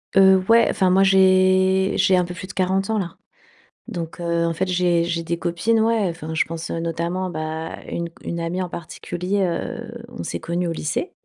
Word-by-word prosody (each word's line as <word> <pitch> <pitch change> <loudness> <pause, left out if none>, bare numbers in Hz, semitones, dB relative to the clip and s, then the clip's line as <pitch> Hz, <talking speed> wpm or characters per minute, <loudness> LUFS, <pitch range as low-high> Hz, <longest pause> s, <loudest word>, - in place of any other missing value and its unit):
Heu, 190 -1 +6
ouais, 230 +1 +6
enfin 185 - +2
moi 190 +2 +5
j'ai 190 0 +4
j'ai 185 - +4
un 180 - +2
peu 175 - -6
plus 185 +1 -8
de - - -9
40 190 +1 0
ans 220 - +1
là. 180 -5 -3 0.7
Donc, 170 -1 -6
heu, 170 -1 0
en 165 - 0
fait, 190 +4 -1
j'ai 175 -2 +2
j'ai 170 -1 -2
des 170 0 -3
copines, 175 +7 +1
ouais, 220 -3 +2
enfin 160 -1 -6
je - - +3
pense, 165 0 -6
heu, 165 - -2
notamment 170 +3 -2
bah, 160 0 -4
une 170 0 -3
c - - -30
une 170 - -4
amie 170 +2 -2
en 180 - -3
particulier, 180 +4 -3
heu 235 +6 -4
on 240 - -8
s'est - - -4
connues 170 +2 -2
au - - -1
lycée. 160 - -3
180 Hz, 215 wpm, -22 LUFS, 170-190 Hz, 0.7 s, Heu